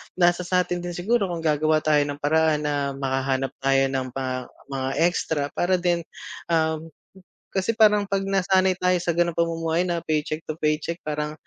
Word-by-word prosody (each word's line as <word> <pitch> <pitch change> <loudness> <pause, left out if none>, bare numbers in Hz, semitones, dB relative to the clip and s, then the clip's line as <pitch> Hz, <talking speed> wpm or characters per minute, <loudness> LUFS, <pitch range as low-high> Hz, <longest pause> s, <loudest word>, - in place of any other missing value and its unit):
nasa 175 0 +2
sa'tin 180 -1 0
din 175 -1 -5
siguro 205 +2 +1
kung 170 -2 -4
gagawa 155 0 +2
tayo 150 -1 +4
ng 145 0 -6
paraan 155 0 +2
na 140 -2 -1
makahanap 135 0 -1
tayo 135 0 +3
ng 130 -1 -1
mga 130 -1 -2 0.4
mga 135 -1 -2
extra 160 -4 +1
para 185 +1 +1
din, 175 -1 +1 0.5
um, 160 -1 0 0.7
kasi 190 +4 0
parang 210 -2 +5
'pag 195 -1 0
nasanay 190 -1 +2
tayo 180 0 +2
sa 170 0 0
ganong 170 -1 +1
pamumuhay 165 0 0
na 175 -2 -1
paycheck 155 0 -1
to 155 - -2
paycheck, 155 +3 -1
parang 150 0 -2
160 Hz, 165 wpm, -24 LUFS, 150-180 Hz, 0.7 s, parang